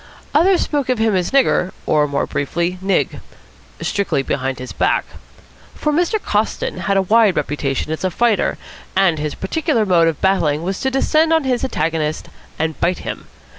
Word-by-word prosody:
Others 355 +5 +4
spoke 285 -4 -1
of 255 - +2
him 220 -2 +2
as 180 -2 0
Nigger, 260 -9 +2
or, 150 -1 +2
more 140 -1 -1
briefly, 170 +5 -2
Nig 195 +1 0 0.6
strictly 200 -9 0
behind 135 -1 -2
his 130 - -7
back. - - +1 0.7
For 300 - -1
Mr. 350 +7 +1
Coston 210 - -1
had 195 +2 0
a 195 - +3
wide 210 -1 +4
reputation 145 0 -2
as 160 - -4
a 185 - +2
fighter, 225 +1 +1 0.4
and 185 -5 +3
his 150 0 -3
particular 265 - 0
mode 170 -4 +4
of 160 -3 -1
battling 165 -6 +1
was 190 +2 -3
to 265 - 0
descend 310 +4 +2
on 320 -1 +3
his 255 -2 0
antagonist 160 -11 -2 0.3
and 160 -1 -2
bite 175 +1 +1
him. - - -6
190 Hz, 170 wpm, -19 LUFS, 160-255 Hz, 0.7 s, Others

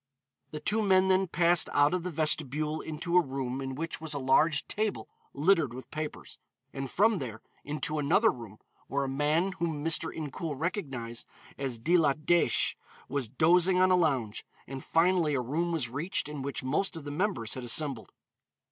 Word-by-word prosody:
The 150 - -6
two 210 +8 0
men 190 -2 +3
then 190 0 +3
passed 170 0 +3
out 145 +3 +4
of 180 - 0
the 180 - -4
vestibule 155 -1 +1
into 165 +3 -4
a - - +7
room 135 -2 -4
in 135 -1 -4
which 165 +2 -5
was 155 -2 -4
a - - -1
large 140 +4 +2
table 215 -1 -2 0.2
littered 150 -4 +2
with 130 - -10
papers, 155 -2 -6 0.3
and 135 -1 -5
from 215 - +3
there 115 -5 -7 0.2
into 150 +1 -3
another 180 +10 +3
room 115 -4 -10 0.3
where 140 0 -1
a - - -2
man 150 +7 +1
whom 160 -3 -2
Mr. 165 0 +1
Incoul 155 0 -5
recognized 135 - -4 0.3
as 135 -4 -3
De 165 +11 +2
la 150 -4 +3
Dèche 165 +3 +2 0.4
was 135 -5 -2
dozing 175 - +3
on 185 0 +4
a - - +6
lounge, 130 -11 0 0.2
and 135 0 -7
finally 165 -3 +2
a - - +1
room 160 +8 -1
was 160 -7 -1
reached 145 +8 -2
in 150 -2 -6
which 140 0 -4
most 155 +9 -1
of 160 - -7
the 145 - -6
members 145 - -1
had 130 - -6
assembled. 125 -1 0
150 Hz, 185 wpm, -29 LUFS, 135-175 Hz, 0.4 s, a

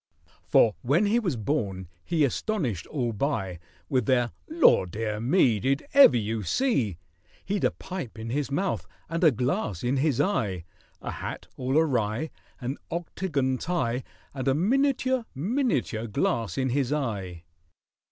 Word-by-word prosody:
For 110 - +5
when 145 - +3
he 220 +4 +3
was 180 - -1
born 100 - -2 0.2
he 165 -3 +1
astonished 135 - -2
all 125 -6 -2
by, 100 - -2 0.3
With 130 -5 0
their 120 -2 +2 0.2
"Law, 320 - +5
dear 105 +3 -3
me!" 120 - +3
"Did 135 +5 0
ever 275 - +8
you 110 0 -2
see?" 115 - 0 0.5
He'd 200 +1 -1
a - - +5
pipe 180 -12 -7
in 115 +1 -5
his 140 +1 -1
mouth 140 - -1 0.2
and 165 +2 -2
a 160 - +8
glass 125 - -1
in 125 +3 +1
his 140 -2 +1
eye, 100 - 0 0.4
A - - -3
hat - - -6
all 130 +3 0
awry— 130 -2 +1 0.3
An 130 +2 -4
octagon 150 -6 -1
tie— 130 -8 -1 0.3
And 135 -1 -4
a 135 - +3
miniature—miniature 235 - 0
glass 110 -2 -1
in 130 -1 +1
his 135 +1 0
eye. 100 - -3
130 Hz, 145 wpm, -27 LUFS, 110-170 Hz, 0.5 s, ever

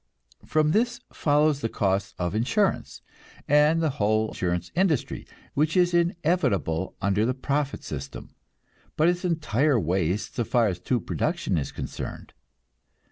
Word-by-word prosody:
From 155 -1 +2
this 240 +5 +1
follows 150 -1 +2
the 115 - -1
costs 100 -1 -1
of 90 0 -2
insurance, 185 - 0 0.4
and 150 +3 +4
the 155 - +2
whole 110 +1 +2
insurance 90 -1 -2
industry, 170 -5 0 0.3
which 155 +4 +1
is 180 -1 +3
inevitable 170 - 0
under 100 +2 +2
the 125 +2 0
profit 140 +1 -2
system, 70 -2 -7 0.6
but 155 - +4
is 175 +1 +1
entire 155 - +1
waste 90 +2 -1
so 125 -5 -1
far 120 +1 +2
as 90 -3 -2
true 125 +7 0
production - - -1
is 75 -4 -2
concerned. - - -7
135 Hz, 135 wpm, -26 LUFS, 100-160 Hz, 0.6 s, and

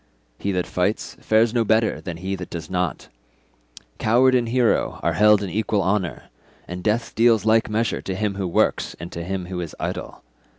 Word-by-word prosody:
He 100 - -1
that 90 -1 0
fights - - -1
fares 110 +1 +2
no 120 -2 +2
better 110 0 +1
than 90 -4 -6
he 95 +3 -4
that 90 - -7
does 85 -1 -7
not; 90 -3 -2 0.9
coward 125 +4 +4
and 120 -2 +2
hero 125 -1 +1
are - - +1
held 105 -1 +5
in 95 - -4
equal 105 -1 0
honour, 95 -3 -1 0.4
and 90 +1 -6
death 110 +2 0
deals 115 -2 +3
like 110 0 +3
measure 110 +1 0
to 95 - -4
him 105 +1 -1
who 95 -1 -3
works 85 - +1
and 85 +1 -8
him 90 +2 -4
who 90 0 -4
is 85 -3 -7
idle. - - -5
105 Hz, 185 wpm, -23 LUFS, 90-110 Hz, 0.9 s, held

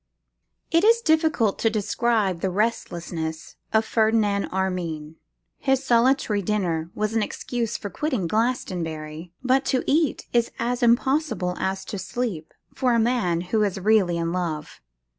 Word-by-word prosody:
_ - - 0
IT 335 - +5
IS 460 +2 +6
difficult 315 - +2
to 225 - +3
describe 215 -3 0
the 190 - 0
restlessness 170 -6 -3
of 220 0 +3
Ferdinand 215 -3 +2
Armine. 170 -5 -3 0.4
His 270 0 +1
solitary 240 -3 +3
dinner 175 -5 -1
was 215 +1 -1
an 225 - +2
excuse 235 +2 -3
for 205 - -6
quitting 260 - -1
Glastonbury: 165 -7 -2
but 260 +1 +3
to 255 - +1
eat 305 -1 +1
is 235 -1 +3
as 245 +2 -1
impossible 240 - +2
as 190 0 -2
to 200 - -5
sleep, 185 -5 -4 0.2
for 250 -2 +1
a - - +3
man 220 -8 +1
who 220 - +4
is 200 -2 0
really 190 -4 +3
in 165 0 -1
love. 165 -4 -4
215 Hz, 145 wpm, -24 LUFS, 180-245 Hz, 0.4 s, IS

